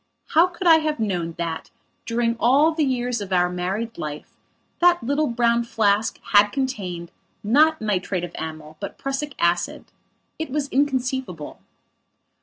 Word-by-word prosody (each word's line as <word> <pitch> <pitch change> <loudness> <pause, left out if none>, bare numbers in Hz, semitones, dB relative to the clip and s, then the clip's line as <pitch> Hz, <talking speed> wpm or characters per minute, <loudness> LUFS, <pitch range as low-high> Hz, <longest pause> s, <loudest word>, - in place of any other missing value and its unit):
How 330 +3 +5
could 360 +1 -8
I 330 -2 +8
have 310 -3 -1
known 175 -6 -2
that, 165 -1 -4 0.4
during 230 0 0
all 275 +7 +4
the 315 -1 +1
years 245 -4 -1
of 195 -1 -6
our 180 -1 +2
married 195 +6 -3
life, 150 -1 -6 0.4
that 350 -3 +4
little 285 +5 +1
brown 235 0 +2
flask 215 -1 +1
had 205 0 +7
contained, 200 -9 -4 0.3
not 305 +9 +4
nitrate 190 -3 -1
of 175 - -5
amyl, 155 -1 -7
but 200 - -6
prussic 275 +1 -3
acid? 170 0 0 0.5
It 320 - -3
was 280 +1 -2
inconceivable. 260 - -1
230 Hz, 145 wpm, -23 LUFS, 180-280 Hz, 0.5 s, I